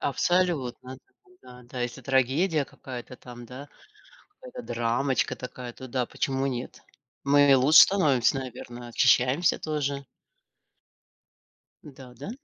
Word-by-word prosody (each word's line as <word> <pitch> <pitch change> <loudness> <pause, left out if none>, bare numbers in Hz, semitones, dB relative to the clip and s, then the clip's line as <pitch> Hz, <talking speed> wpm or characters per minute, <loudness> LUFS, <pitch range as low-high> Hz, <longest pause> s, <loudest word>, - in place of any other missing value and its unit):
Абсолютно, 140 -6 -1
да, - - -27 0.3
да, 125 0 -14
да, 125 +1 -8
если 120 0 -5
трагедия 140 +5 +1
какая-то 125 -1 -10
там, 120 -1 -12
да, 130 +5 -10 0.7
какая-то 250 -1 -9
драмочка 120 - -1
такая, 125 -1 -8
то 130 - -10
да, 125 -1 -2
почему 135 0 -2
нет? 125 -2 -6 0.4
Мы 140 0 +5
лучше 135 +4 +7
становимся, 140 - +2
наверно, 120 -1 -9
очищаемся 130 +7 +2
тоже. 145 -3 -3 1.8
Да, 130 -4 -13
да. 125 - -8
130 Hz, 115 wpm, -26 LUFS, 125-145 Hz, 1.8 s, лучше